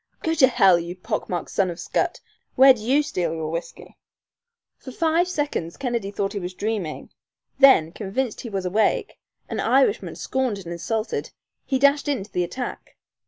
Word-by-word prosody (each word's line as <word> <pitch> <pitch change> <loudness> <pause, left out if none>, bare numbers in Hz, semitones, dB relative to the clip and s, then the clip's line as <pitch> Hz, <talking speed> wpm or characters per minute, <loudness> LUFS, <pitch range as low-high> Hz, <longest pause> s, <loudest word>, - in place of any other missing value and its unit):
"Go 325 - +1
to 290 -5 +6
hell, 190 -8 +5
you 170 +1 -6
pock 215 +4 -4
marked 175 -2 -3
son 195 -2 +1
of 175 - -4
a - - -16
scut! - - -1 0.3
Where'd 265 -2 +7
you 265 +7 +2
steal 175 - -2
your 160 -1 -4
whiskey?" 165 +1 -7 0.8
For 260 - -11
five 330 +5 +1
seconds 290 - -3
Kennedy 240 -6 -2
thought 200 0 -2
he 205 - -3
was 180 0 -6
dreaming. 205 -7 -4 0.5
Then, 265 - +6
convinced 215 +5 -3
that - - -5
he 235 - -7
was 195 -3 -3
awake, 205 +4 0 0.3
an - - -4
Irishman 445 -3 +2
scorned 260 -5 -1
and 195 - -10
insulted, 220 +6 -3 0.4
he 270 - +1
dashed 280 +2 +3
in 275 -8 -1
to 200 - -16
the 180 - +1
attack. 250 +8 -6
215 Hz, 180 wpm, -23 LUFS, 180-265 Hz, 0.8 s, Where'd